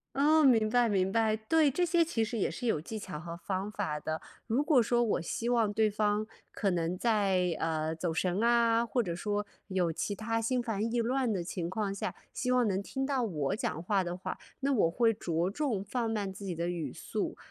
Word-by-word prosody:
哦， 305 +3 +5
明 230 -6 +5
白， 240 0 +3
明 190 -2 +1
白。 220 0 +2
对， 295 +8 +3
这 355 +7 +1
些 340 0 +3
其 310 -9 0
实 230 +1 -3
也 - - +1
是 250 - -6
有 220 -10 +1
技 220 +7 -6
巧 185 -7 -6
和 170 +1 -7
方 190 +3 -3
法 170 -8 -2
的。 155 +1 -3 0.3
如 240 +6 +2
果 295 -4 +5
说 240 +1 +2
我 220 -6 +1
希 230 +8 -3
望 230 -4 +2
对 215 +1 +2
方 210 0 +1 0.3
可 200 -3 0
能 175 0 -1
在， 190 -6 +2
呃， 160 0 -1
走 165 +1 -2
神 180 +4 0
啊， 235 0 +4
或 240 +1 0
者 170 -4 -3
说 205 +3 -2 0.2
有 180 -4 0
其 205 +5 -2
它 225 +2 -1
心 250 +2 +1
烦 225 0 -1
意 240 - +1
乱 250 +1 +1
的 190 -4 -1
情 170 -1 -4
况 200 +1 -2
下， 200 - -4 0.2
希 250 - -2
望 250 -2 +3
能 195 -1 0
听 270 +6 -3
到 270 -2 0
我 165 -5 -1
讲 165 -6 -3
话 195 +1 +1
的 175 0 -4
话， 185 - -5 0.2
那 275 +1 +2
我 205 -9 +3
会 230 +4 +3
着 170 -4 -1
重 235 -6 -1
放 230 +3 -2
慢 205 -3 -2
自 195 - -10
己 185 -3 -3
的 170 +1 -2
语 165 -7 -3
速。 - - -4
210 Hz, 240 characters per minute, -31 LUFS, 180-235 Hz, 0.3 s, 哦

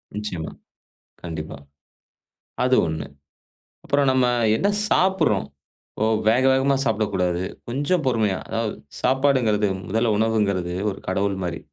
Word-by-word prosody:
நிச்சயமா. 100 -7 -4 0.7
கண்டிப்பா. 80 -3 -6 1.1
அது 130 0 +3
ஒண்ணு. 80 -3 -4 0.8
அப்புறம் 140 -1 +2
நம்ம 130 -1 +3 0.3
என்ன 200 - +1 0.2
சாப்புடுறோம், 175 - +2 0.5
ஒ 110 - +3 0.2
வேக 125 +4 +3
வேகமா 135 +1 +3
சாப்பிடக்கூடாது. 95 -7 0 0.3
கொஞ்சம் 145 +7 0
பொறுமையா, 110 -6 +1
அதாவது 115 -1 -2 0.3
சாப்பாடுங்கிறது 130 -6 +2 0.2
முதல்ல 110 +2 +1
உணவுங்கிறது 100 -5 0 0.2
ஒரு 100 - -5
கடவுள் 100 +2 0
மாரி 85 -1 -3
110 Hz, 105 wpm, -23 LUFS, 95-130 Hz, 1.1 s, அது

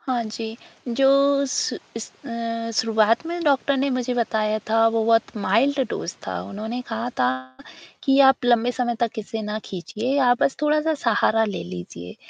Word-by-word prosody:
हाँ 250 -3 -1
जी। 220 +1 -6 0.3
जो 275 +2 +4
शु 445 +12 -1 0.2
इस - - -5 0.2
अ, 230 -1 -4
शुरुआत 225 +4 +2
में 345 0 -4
डॉक्टर 280 -1 +2
ने 275 +1 0
मुझे 250 -1 -1
बताया 215 -2 0
था 225 0 +4
वो 225 -1 0
बहुत 225 0 +2
माइल्ड 230 +8 +2
डोज़ 170 - -4
था। - - -3
उन्होंने 220 +5 -5
कहा 230 +1 -3
था 125 - +4 0.8
कि 270 0 +4
आप 265 - -3
लंबे 240 0 +3
समय 240 -1 -1
तक 230 -2 -1
इसे 220 +1 -5
ना 210 +1 -3
खींचिए 225 +9 -3
आप 245 +1 +3
बस 270 - +2
थोड़ा-सा 305 +1 +2
सहारा 225 -1 +3
ले 205 -4 -4
लीजिए 90 0 -9
230 Hz, 170 wpm, -23 LUFS, 220-265 Hz, 0.8 s, जो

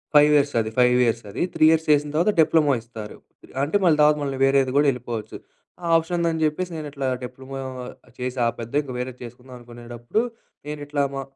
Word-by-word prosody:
5 150 0 +7
years 145 0 +2
అది. 110 -1 -1
5 125 0 +5
years 115 0 -1
అది. 100 - -5
3 - - +4
years 160 0 +1
చేసిన 145 0 +3
తరువాత 175 +7 +3
డిప్లొమా 155 -2 +3
ఇస్తారు. 110 -2 -10 0.5
అంటే 150 +8 +1
మళ్ళీ 155 -3 +4
తర్వాత 150 0 +5
మళ్ళీ 135 -1 -3
వేరేది 135 -1 +3
కూడా 145 0 +4
ఎళ్ళిపోవచ్చు. 120 -3 -6 0.5
ఆ - - -4
ఆప్షన్ 165 +2 -2
ఉందని 165 -1 0
జెప్పేసి 170 +4 -1
నేను 155 -1 -5
ఇట్లా 140 -2 -4 0.2
డిప్లొమా 130 +2 -8 0.6
చేసి 125 +1 -4
ఆపేద్దాం 115 +4 -2
ఇంక 130 - -8
వేరేది 125 0 -5
చేసుకుందాం 125 +2 -12
అనుకునేటప్పుడు 120 - -4 0.4
నేను 150 0 -6
ఇట్లా 145 -1 -1
మా 135 - -3
135 Hz, 185 wpm, -23 LUFS, 120-150 Hz, 0.6 s, 5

